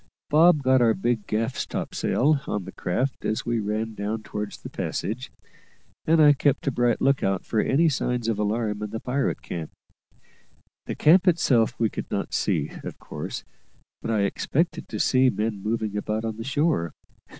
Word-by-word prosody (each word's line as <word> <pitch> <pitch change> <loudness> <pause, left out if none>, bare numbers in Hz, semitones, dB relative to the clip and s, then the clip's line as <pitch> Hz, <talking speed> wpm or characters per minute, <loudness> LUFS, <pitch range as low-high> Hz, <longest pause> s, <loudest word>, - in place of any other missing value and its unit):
Bob 155 0 +5
got 130 -1 +4
our 115 -2 +4
big 115 +1 -1
gaff 115 +4 -1
topsail 145 +2 0
on 105 -3 -2
the 95 - -7
craft 125 +12 -2
as 110 - -1
we 120 -1 0
ran 110 +2 -2
down 105 +1 -3
towards 105 -1 -5
the - - -8
passage, 125 +5 -4 0.8
and 160 +1 +4
I 150 -1 +8
kept 145 0 +1
a 140 - +1
bright 120 -2 +1
look 135 0 +3
out 95 -1 0
for 110 - 0
any 150 +9 +3
signs 125 -5 -1
of 110 -3 0
alarm 105 0 -1
in 105 - -3
the 110 - -4
pirate 135 +4 -1
camp. 80 -3 -5 1.2
The - - -3
camp 175 +5 +5
itself 130 -10 +3
we 115 -2 +2
could - - -6
not - - -3
see, - - 0
of - - -7
course; - - -6 0.6
but - - -4
I 110 -2 +2
expected 150 - -1
to - - -4
see 130 0 +4
men 105 -3 -2
moving 110 0 -2
about 105 +2 -2
on 110 -1 -3
the 115 - -5
shore. 140 - 0
115 Hz, 180 wpm, -25 LUFS, 105-135 Hz, 1.2 s, I